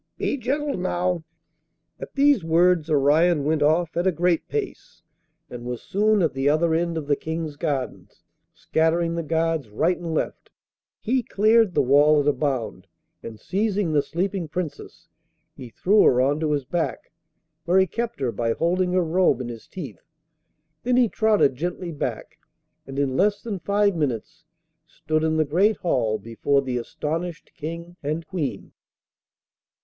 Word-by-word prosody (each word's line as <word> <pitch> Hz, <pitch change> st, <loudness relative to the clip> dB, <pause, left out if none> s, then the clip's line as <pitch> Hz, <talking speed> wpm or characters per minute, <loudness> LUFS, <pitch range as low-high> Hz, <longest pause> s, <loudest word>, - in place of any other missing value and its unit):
Be -, -, -1 dB
gentle 280 Hz, 0 st, -2 dB
now!' 180 Hz, -1 st, -1 dB, 0.8 s
At -, -, -9 dB
these 280 Hz, -, +4 dB
words 165 Hz, 0 st, +3 dB
Orion 150 Hz, +2 st, +3 dB
went 155 Hz, +1 st, 0 dB
off 160 Hz, +3 st, +2 dB
at 175 Hz, +2 st, +1 dB
a -, -, +4 dB
great 175 Hz, 0 st, 0 dB
pace, 430 Hz, -3 st, -5 dB, 0.4 s
and 120 Hz, -3 st, -9 dB
was 125 Hz, -1 st, -5 dB
soon 210 Hz, 0 st, +2 dB
at 160 Hz, -, +1 dB
the 135 Hz, +1 st, +1 dB
other 160 Hz, +2 st, +2 dB
end 170 Hz, 0 st, 0 dB
of 155 Hz, -, -4 dB
the 145 Hz, 0 st, +2 dB
King's 160 Hz, 0 st, -5 dB
gardens. 145 Hz, -4 st, -4 dB, 0.3 s
Scattering 165 Hz, +1 st, 0 dB
the 170 Hz, -, -2 dB
guards 160 Hz, -4 st, -1 dB
right 165 Hz, -, +1 dB
and 170 Hz, -2 st, -6 dB
left, -, -, -3 dB, 0.5 s
he 255 Hz, +3 st, +1 dB
cleared 215 Hz, -2 st, +3 dB
the -, -, +3 dB
wall 145 Hz, +3 st, +5 dB
at 145 Hz, -, 0 dB
a 145 Hz, -, +4 dB
bound, 120 Hz, -11 st, -3 dB, 0.3 s
and 110 Hz, -2 st, -9 dB
seizing 200 Hz, -3 st, -1 dB
the 145 Hz, -, +4 dB
sleeping 180 Hz, +2 st, -3 dB
Princess, 165 Hz, 0 st, -6 dB, 0.5 s
he 125 Hz, -, -9 dB
threw 200 Hz, -, +3 dB
her 125 Hz, -, +5 dB
on 140 Hz, +4 st, +2 dB
to 155 Hz, -1 st, 0 dB
his 145 Hz, -3 st, -1 dB
back, 165 Hz, +5 st, -3 dB, 0.5 s
where 180 Hz, +2 st, +3 dB
he 190 Hz, -, +5 dB
kept 235 Hz, +5 st, -4 dB
her 125 Hz, -3 st, 0 dB
by 115 Hz, 0 st, -1 dB
holding 180 Hz, +4 st, 0 dB
her 185 Hz, -1 st, +3 dB
robe 175 Hz, 0 st, +2 dB
in 125 Hz, -2 st, -5 dB
his 115 Hz, -2 st, -9 dB
teeth. 180 Hz, -8 st, -8 dB, 0.8 s
Then 250 Hz, +1 st, +1 dB
he 245 Hz, -3 st, +4 dB
trotted 215 Hz, -11 st, +3 dB
gently 175 Hz, +4 st, -4 dB
back, 150 Hz, -, -5 dB, 0.5 s
and 135 Hz, 0 st, -7 dB
in 140 Hz, -2 st, 0 dB
less 205 Hz, +5 st, +1 dB
than 210 Hz, -5 st, -4 dB
five 200 Hz, +1 st, +1 dB
minutes 150 Hz, +1 st, -3 dB, 0.4 s
stood 155 Hz, 0 st, -2 dB
in 160 Hz, 0 st, +1 dB
the 155 Hz, -, +2 dB
great 190 Hz, +9 st, +2 dB
hall 115 Hz, -10 st, 0 dB
before 115 Hz, +6 st, 0 dB
the 125 Hz, -2 st, -2 dB
astonished 160 Hz, +6 st, -5 dB
King 170 Hz, +3 st, -7 dB
and 155 Hz, +3 st, -3 dB
Queen. 145 Hz, -, -4 dB
165 Hz, 165 wpm, -24 LUFS, 145-185 Hz, 0.8 s, wall